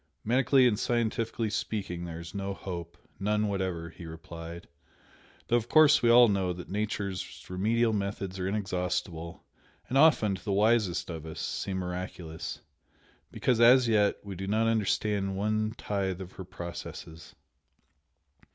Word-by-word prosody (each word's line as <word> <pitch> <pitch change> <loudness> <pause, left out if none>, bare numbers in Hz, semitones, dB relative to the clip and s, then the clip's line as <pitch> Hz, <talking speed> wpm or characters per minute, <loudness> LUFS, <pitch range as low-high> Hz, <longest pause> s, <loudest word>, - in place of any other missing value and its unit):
"Medically 130 +2 +4
and 110 -3 +1
scientifically 115 -2 -1
speaking, 95 -5 -3
there 85 -1 -6
is 85 +1 -9
no 100 -1 -3
hope, 85 -3 -7 0.2
none 105 +1 +1
whatever" 95 -4 -2
he 85 0 -10
replied 85 +1 -9 0.8
"Though 120 - +3
of 120 0 -4
course 155 -1 +6
we 120 - +3
all 120 +1 +8
know 95 -3 0
that 90 +1 -9
Nature's 100 -2 -3
remedial 110 +5 +1
methods 100 -2 -3
are 90 - -1
inexhaustible, 90 -4 -3 0.4
and 135 - +2
often, 125 -10 +5
to 95 - -6
the 100 - -1
wisest 105 -4 +2
of 80 -1 -7
us, 80 - -7
seem 95 -1 -3
miraculous, 90 -2 -5 0.7
because 125 -3 +1
as 125 +1 +7
yet 105 -3 +3
we 100 -1 -6
do 95 +2 -5
not 110 +3 +2
understand 105 -3 0
one 110 +2 0
tithe 95 -3 -2
of 95 -1 -8
her 95 - -9
processes. 85 -2 -8
100 Hz, 145 wpm, -29 LUFS, 90-110 Hz, 0.8 s, all